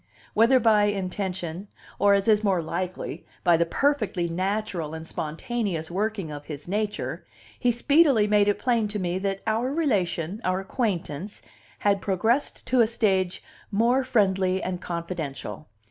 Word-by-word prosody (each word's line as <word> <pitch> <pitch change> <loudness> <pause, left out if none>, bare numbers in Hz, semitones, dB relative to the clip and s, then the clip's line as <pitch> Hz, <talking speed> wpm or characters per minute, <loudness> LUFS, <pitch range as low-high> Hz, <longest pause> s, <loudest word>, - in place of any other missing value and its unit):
Whether 230 +4 +5
by 215 -3 +4
intention, 190 -2 -3 0.3
or, 200 0 +5
as 200 +1 0
is 215 -1 +4
more 195 -4 +2
likely, 180 +3 -4 0.2
by 175 -2 +5
the 170 +1 +2
perfectly 220 - +1
natural 185 -2 -2
and 160 0 -7
spontaneous 165 +1 -3
working 200 -3 -2
of 145 0 -7
his 150 -1 -7
nature, 205 +2 -2 0.4
he 245 - +3
speedily 275 -1 +4
made 205 -1 +3
it 205 - +2
plain 235 -4 +1
to 210 0 -4
me 180 -1 -1
that 195 0 -2
our 225 +4 0
relation, 200 - 0
our 185 0 +1
acquaintance, 195 - -3 0.4
had 200 -1 +3
progressed 220 +9 0
to 255 -1 +3
a 225 - +5
stage 190 -5 +1 0.3
more 235 +6 +2
friendly 190 -6 +2
and 180 -1 -3
confidential. 165 - -5
195 Hz, 145 wpm, -26 LUFS, 175-220 Hz, 0.4 s, Whether